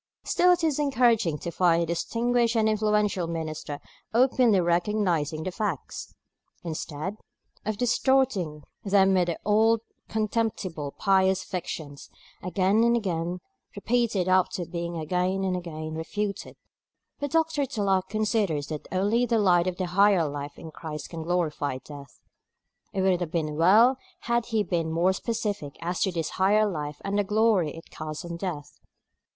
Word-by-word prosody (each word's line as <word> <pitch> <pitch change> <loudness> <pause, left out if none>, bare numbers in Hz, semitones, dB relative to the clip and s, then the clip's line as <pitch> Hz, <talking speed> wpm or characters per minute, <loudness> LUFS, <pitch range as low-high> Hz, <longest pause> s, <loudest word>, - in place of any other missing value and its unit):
Still 360 +1 +3
it 350 -1 +2
is 305 -3 +1
encouraging 235 - +2
to 170 - -5
find 170 -1 +3
a - - -1
distinguished 235 +7 0
and 220 -1 +3
influential 210 -4 +1
minister 155 -3 -4 0.4
openly 245 -4 +4
recognising 175 -3 0
the 185 - -3
facts, 190 -7 -4 0.5
instead 165 +3 -5 0.5
of 215 -1 -1
distorting 230 - +1 0.2
them 195 -1 +4
with 180 -2 +3
the 170 - -2
old 220 +2 +4 0.3
contemptible 215 -8 -2
pious 190 -1 +3
fictions, 160 -6 -6 0.3
again 190 +5 +2
and 235 0 +4
again 175 -4 -2 0.3
repeated 230 -6 0
after 185 -1 +2
being 170 0 -4
again 180 +4 -1
and 185 -1 0
again 155 -3 -5
refuted. 200 +6 -4 0.6
But 285 - -2
Dr. 320 -2 +1
Tulloch 195 -5 0
considers 205 -9 0
that 155 -2 -6
only 205 +6 +1
the 230 - +2
light 180 -4 +3
of 180 -1 -2
the 185 - -1
higher 185 -2 +4
life 145 0 -6
in 160 - -9
Christ 155 -2 -7
can 165 -2 -5
glorify 160 -5 -1
death. 140 +1 -12 0.7
It 195 - -1
would 185 -2 +2
have 175 - -2
been 155 -2 -2
well 215 - +5 0.2
had 235 -1 0
he 220 -3 +1
been 165 -3 -1
more 175 +3 +2
specific 205 -9 -3
as 175 +2 -3
to 190 - +2
this 165 -3 -2
higher 210 +3 +4
life 150 -5 -4
and 200 +1 0
the - - +3
glory 210 -6 +2
it 165 - -13
casts 155 +1 -6
on 170 0 -5
death. 165 -6 -6
185 Hz, 150 wpm, -26 LUFS, 165-215 Hz, 0.7 s, well